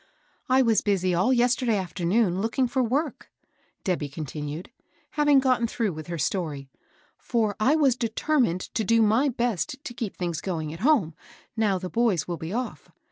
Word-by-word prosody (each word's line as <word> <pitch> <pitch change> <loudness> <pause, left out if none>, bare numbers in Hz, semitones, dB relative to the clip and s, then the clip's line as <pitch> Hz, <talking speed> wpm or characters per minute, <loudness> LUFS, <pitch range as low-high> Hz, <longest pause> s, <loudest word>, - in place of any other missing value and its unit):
I 260 +1 +5
was 225 -3 +3
busy 185 -3 +1
all 185 +9 +2
yesterday 245 -2 +2
afternoon 185 +1 0
looking 240 +4 +1
for 260 +1 0
work," 275 +6 -2 0.5
Debby 170 -7 -1
continued, 150 - -6 0.4
having 295 -2 +4
gotten 255 -3 +2
through 225 -4 -1
with 155 -1 -8
her 170 -1 -4
story; 145 -4 -2 0.3
" - - -36
for 220 -4 +1
I 260 +8 +4
was 275 -6 +3
determined 230 - 0
to 220 - -3
do 230 +3 +4
my 225 +7 +3
best 235 - -1
to 240 - -6
keep 230 -4 -5
things 170 -3 -3
going 160 -5 -3
at 165 - -9
home, 225 - +3 0.4
now 210 -4 +2
the 185 0 -5
boys 210 -6 +1
will 175 -1 -3
be 160 +2 -6
off. 245 +4 -4
215 Hz, 175 wpm, -26 LUFS, 175-245 Hz, 0.5 s, I